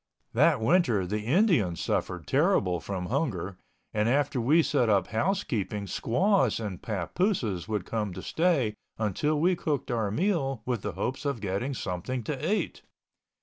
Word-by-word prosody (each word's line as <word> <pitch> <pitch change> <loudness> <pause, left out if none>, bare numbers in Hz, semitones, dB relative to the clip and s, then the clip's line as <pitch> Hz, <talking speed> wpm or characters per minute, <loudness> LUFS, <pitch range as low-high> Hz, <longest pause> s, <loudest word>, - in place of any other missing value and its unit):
That 145 +3 +4
winter 115 - +3
the 105 +4 -2
Indians 125 - +2
suffered 90 -2 -2
terrible 135 - +2
from 90 +3 -4
hunger 100 - -2 0.3
and 105 +1 +1
after 140 0 +1
we 155 +8 +4
set 125 -7 +2
up 100 -3 +3
housekeeping 110 - -1
squaws 185 - +2
and 100 -5 -5
papooses 110 - -1
would 105 -4 -2
come 105 -3 -2
to - - -7
stay 160 -10 +1 0.2
until 130 +9 0
we 180 +4 +3
cooked 150 -7 -2
our 110 -4 0
meal 135 - 0
with 125 -5 -1
the 105 -2 -4
hopes 120 +9 -3
of 140 -5 -1
getting 105 +7 -2
something 105 +6 -3
to 150 - -2
eat. 215 - -1
120 Hz, 150 wpm, -28 LUFS, 100-150 Hz, 0.3 s, That